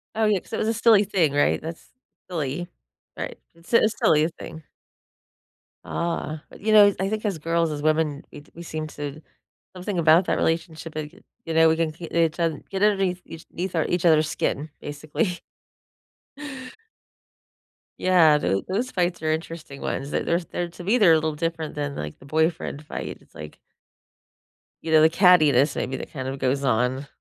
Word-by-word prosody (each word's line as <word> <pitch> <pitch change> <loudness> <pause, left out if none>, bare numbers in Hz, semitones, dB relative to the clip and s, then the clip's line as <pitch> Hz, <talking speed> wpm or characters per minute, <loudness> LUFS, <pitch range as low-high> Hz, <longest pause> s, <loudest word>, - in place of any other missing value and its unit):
Oh, 220 0 +2
yeah, 210 -2 +3
'cause - - -17
it - - 0
was - - -1
a 225 - +2
silly 225 -2 +5
thing, 180 -8 +1
right? 145 - +2
That's 165 +1 -8 0.4
silly, 165 0 -3 0.5
right, - - -5 0.2
it's 170 +6 -15
a 230 - +6
silly 155 -7 +3
thing. 160 - -9 1.2
Ah, 165 -2 -3
but, - - -15
you 220 - 0
know, 205 -1 +7
I 195 - 0
think 215 +1 -3
as 195 -5 -1
girls, 165 +1 0
as 150 -1 -4
women, 155 -1 0
we 145 - -11
we 170 - -8
seem 155 -2 -5
to 145 0 -7 0.5
something 180 0 -3
about 165 +3 +5
that - - 0
relationship, 165 -1 -2
like, 150 -1 -4 0.3
you 165 - -3
know, 160 0 +6
we 160 - +3
can 165 -1 0
k 165 +2 -9
each 165 0 +1
other 165 -3 0
get 195 +1 -2
underneath 195 -3 +2
each 165 - -11
eth 180 +1 -3
each 175 0 0
other's 155 -2 +4
skin, 150 +3 -2
basically. 155 +6 -3 2.6
Yeah, 165 -5 +5
tho 95 -8 0
those 220 +7 -1
fights 175 -5 -1
are 155 0 0
interesting 160 -3 -5
ones, 135 +1 -3
th - - -2
there's, 170 +1 0
they're 175 - -3
to 170 +1 -11
me, 210 +7 +2
they're 195 -8 +6
a - - +6
little 155 -1 -2
different 165 0 -3
than, 145 -1 -3
like, 75 0 -6
the - - -16
boyfriend 160 0 -1
fight, - - -6
it's - - -25
like 75 0 -10 1.3
you 160 - -4
know, 155 -1 +6
the 160 - +6
cattiness, 155 -6 +4
maybe, 130 - -2
that - - -7
kind 130 -4 -5
of 135 +1 -4
goes 135 +2 0
on. 125 +3 0
160 Hz, 185 wpm, -24 LUFS, 150-180 Hz, 2.6 s, know